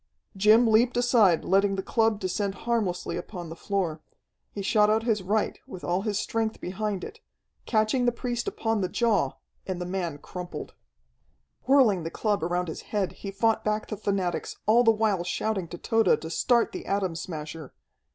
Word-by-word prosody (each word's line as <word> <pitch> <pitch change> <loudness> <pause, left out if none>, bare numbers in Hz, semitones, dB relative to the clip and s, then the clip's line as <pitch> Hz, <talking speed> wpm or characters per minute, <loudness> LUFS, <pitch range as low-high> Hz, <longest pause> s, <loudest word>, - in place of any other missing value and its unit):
Jim 215 +5 +5
leaped 235 +2 +3
aside, 230 -8 +4
letting 195 +1 +3
the 190 - -3
club 225 0 +1
descend 195 +1 -2
harmlessly 195 -7 -1
upon 175 -1 -7
the 165 - -7
floor. 170 -4 -2 0.5
He 200 - -5
shot 210 +1 +4
out 220 +1 +2
his 220 -4 +1
right 205 +3 -1
with 185 - -9
all 180 +2 0
his 210 -1 -1
strength 225 -1 -2
behind 195 +1 -3
it, - - -8 0.5
catching 225 +3 +2
the - - +4
priest 240 0 -3
upon 225 -2 -1
the 185 - -1
jaw, 230 +1 +1 0.3
and 185 -2 -3
the 180 - -3
man 175 -4 -3
crumpled. 180 +4 -7 0.9
Whirling 255 -9 +5
the 165 - -4
club 205 0 -1
around 175 +1 -1
his 160 - -6
head, 205 -3 0
he 200 - -8
fought 220 +3 +1
back 215 0 -1
the 215 - -3
fanatics, 195 -4 -2
all 235 +3 +5
the 225 - +5
while 215 -5 +2
shouting 190 0 -2
to 175 - -8
Tode 225 +5 +2
to 160 - -7
start 235 +6 +2
the - - -7
Atom 195 -4 0
Smasher. 160 -3 -6
200 Hz, 180 wpm, -27 LUFS, 180-225 Hz, 0.9 s, Jim